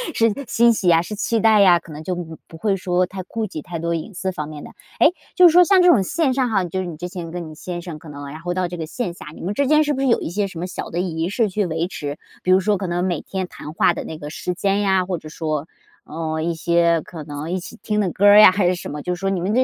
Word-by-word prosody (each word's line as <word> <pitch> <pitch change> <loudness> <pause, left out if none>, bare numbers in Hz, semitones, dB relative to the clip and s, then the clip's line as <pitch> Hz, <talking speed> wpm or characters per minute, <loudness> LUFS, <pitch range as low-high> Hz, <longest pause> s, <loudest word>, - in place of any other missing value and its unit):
是 230 -1 +3 0.2
欣 235 0 +4
喜 190 -4 -2
呀 165 -1 +5
是 210 +5 -6
期 225 +2 0
待 220 -1 +5
呀， 180 -3 +6
可 165 - -14
能 150 0 -8
就 180 +3 -2
不 165 -2 -7
不 165 - -12
会 200 +3 0
说 180 0 +1
太 190 +1 -7
顾 220 +3 -4
忌 160 -6 -6
太 170 +2 -6
多 170 +1 -2
隐 165 +6 -6
私 190 +1 -3
方 150 -5 -5
面 150 -1 -9
的。 - - -10 0.3
诶， 325 - +6 0.2
就 360 -2 +8
是 - - +5
说 355 +2 +7
像 380 0 +5
这 360 - +6
种 245 - +6
线 270 - 0
上 255 -2 +1
哈， 195 -4 +1
就 180 +1 -3
是 185 - -2
你 165 - -6
之 175 +3 -6
前 175 -2 -6
跟 170 -1 -6
你 - - -10
先 175 +1 -6
生 165 -4 -8
可 160 - -14
能 145 0 -8
然 155 +3 -8
后 175 +2 -3
到 185 -1 -1
这 175 - -6
个 160 - -4
线 180 +2 -4
下， - - -12
你 - - -11
们 190 +4 -2
之 280 +5 +1
间 305 +1 +5
是 295 0 0
不 265 - -4
是 270 - +1
有 235 - +3
一 - - -3
些 200 +3 -1
什 170 -3 -9
么 180 - -3
小 185 - -6
的 170 - -3
仪 165 -2 -2
式 215 +2 0
去 205 +2 -1
维 165 0 -2
持， 145 -5 -5 0.2
比 185 - -4
如 185 - +6
说 210 +1 +1
可 190 -1 -4
能 175 +1 -1
每 175 -4 -1
天 190 -1 -4
谈 150 - -9
话 170 - +3
的 - - -5
那 160 - -7
个 150 -1 -7
时 180 +3 -4
间 195 +3 0
呀， 190 -2 +2
或 180 -2 -2
者 155 - -11
说， 155 -1 -3 0.4
嗯， 160 0 -3
一 170 - 0
些 170 0 +2
可 160 -1 -9
能 145 +2 -6
一 185 - -1
起 205 - -10
听 210 -1 -1
的 185 -5 +1
歌 200 - +1
儿 205 +1 +9
呀 210 - +9
还 185 -1 +1
是 180 - +2
什 175 - -7
么， 150 0 -5
就 180 +4 -2
是 175 - -12
说 195 - -1
你 195 -2 -1
们 190 +4 -1
这 250 - +3
180 Hz, 340 characters per minute, -21 LUFS, 165-205 Hz, 0.4 s, 儿